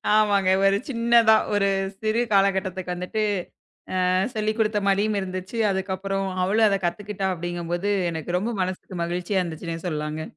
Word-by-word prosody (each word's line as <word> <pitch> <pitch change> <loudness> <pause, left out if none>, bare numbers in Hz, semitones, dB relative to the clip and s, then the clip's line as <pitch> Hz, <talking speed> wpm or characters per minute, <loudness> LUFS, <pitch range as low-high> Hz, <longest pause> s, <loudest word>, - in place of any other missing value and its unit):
ஆமாங்க. 205 -3 +3 0.2
ஒரு 195 0 +4
சின்னதா 230 -2 +5 0.2
ஒரு 200 -1 +2 0.3
சிறு 220 +2 +1
காலகட்டத்துக்கு 190 -2 +1
வந்துட்டு, 180 +5 -2 0.9
அ. - - +3 0.2
சொல்லிக் 215 +1 -1
குடுத்த 215 -1 +2
மாதிரியும் 205 +1 +2
இருந்துச்சு. 185 +3 -5
அதுக்கப்புறம் 195 0 -2 0.2
அவளும் 215 +4 +3
அதக் 195 -2 -1
கத்துக்கிட்டா 195 +1 -3
அப்டிங்கும் 175 0 -5
போது 195 +4 -1 0.2
எனக்கு 170 +2 -3
ரொம்ப 220 +6 -2
மனசுக்கு 185 0 -5
மகிழ்ச்சியா 180 +3 -1
இருந்துச்சுன்னே 165 -1 -5
சொல்லலாங்க. 155 -1 -3
195 Hz, 140 wpm, -24 LUFS, 180-210 Hz, 0.9 s, சின்னதா